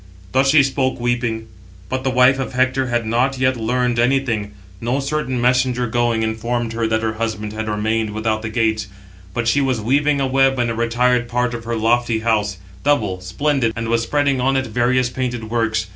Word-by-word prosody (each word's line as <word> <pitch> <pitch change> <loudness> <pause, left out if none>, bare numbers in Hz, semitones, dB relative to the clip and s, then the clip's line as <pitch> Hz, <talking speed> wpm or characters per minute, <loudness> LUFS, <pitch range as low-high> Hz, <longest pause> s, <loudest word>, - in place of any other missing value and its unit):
Thus 135 +4 +3
she 145 0 +6
spoke, 130 -1 -1
weeping; 120 -2 -1 0.4
but 130 0 -3
the 135 - +1
wife 130 +1 +4
of 135 - -4
Hector 130 +1 +1
had 120 -2 -1
not 125 +4 +1
yet 130 0 +2
learned 120 +1 0
anything: 120 -5 +1 0.3
no 120 +4 0
certain 140 -2 -2
messenger 125 0 +2
going, 120 -1 0
informed 115 +1 -2
her 115 0 -1
that 110 0 0
her 110 0 0
husband 110 -1 -3
had 110 0 -4
remained 110 +1 0
without 110 +1 -1
the 110 - -4
gates; 110 -2 0 0.5
but 120 -1 -1
she 140 +6 +3
was 130 -4 0
weaving 140 +6 +1
a 135 - +1
web 135 0 +2
in 120 -1 0
a - - -3
retired 120 +1 +1
part 125 0 0
of 115 -1 -6
her 115 0 -2
lofty 115 0 +1
house; 105 -4 0 0.3
double, 105 -11 +1
splendid, 120 +5 0
and 115 0 -3
was 115 0 +2
spreading 140 +2 +1
on 135 +1 +2
it 130 - 0
various 125 +1 +1
painted 120 -4 -4
works. 110 -2 0
120 Hz, 195 wpm, -19 LUFS, 110-130 Hz, 0.5 s, she